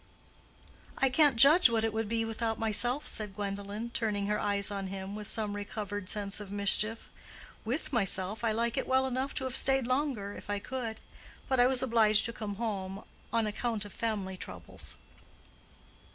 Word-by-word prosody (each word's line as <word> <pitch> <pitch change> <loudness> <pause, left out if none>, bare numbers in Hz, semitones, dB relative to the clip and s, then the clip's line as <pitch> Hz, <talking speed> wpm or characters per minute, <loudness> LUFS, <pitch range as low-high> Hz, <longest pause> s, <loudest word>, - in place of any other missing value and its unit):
"I 270 - +3
can't 290 0 +4
judge 280 +6 +8
what 225 -1 +1
it 225 -1 0
would 220 -1 -2
be 225 0 +1
without 225 0 -2
myself," 240 +6 +1
said 210 -3 -2
Gwendolen, 200 +3 -4
turning 210 -4 -1
her 210 +1 0
eyes 200 -1 0
on 195 -1 -3
him, 190 +1 -6
with 210 -1 -6
some 210 -2 0
recovered 205 -1 -4
sense 200 -1 -1
of 205 -2 -8
mischief. 205 +2 +1 0.6
"With 265 +6 -2
myself 200 -1 +1
I 230 - +2
like 235 +2 0
it - - 0
well 260 0 +3
enough 265 +1 -2
to - - -1
have 260 -1 -3
stayed 270 -2 +3
longer, 255 -6 -1
if - - -11
I 205 - 0
could. 230 0 -4 0.5
But 260 -1 +1
I 245 - +7
was 260 0 +2
obliged 220 -4 +4
to 235 - -2
come 210 -3 -5
home 200 -3 -3 0.3
on 230 -1 +2
account 215 0 -2
of 205 - -10
family 205 -5 -2
troubles." - - -8
220 Hz, 180 wpm, -31 LUFS, 205-240 Hz, 0.6 s, judge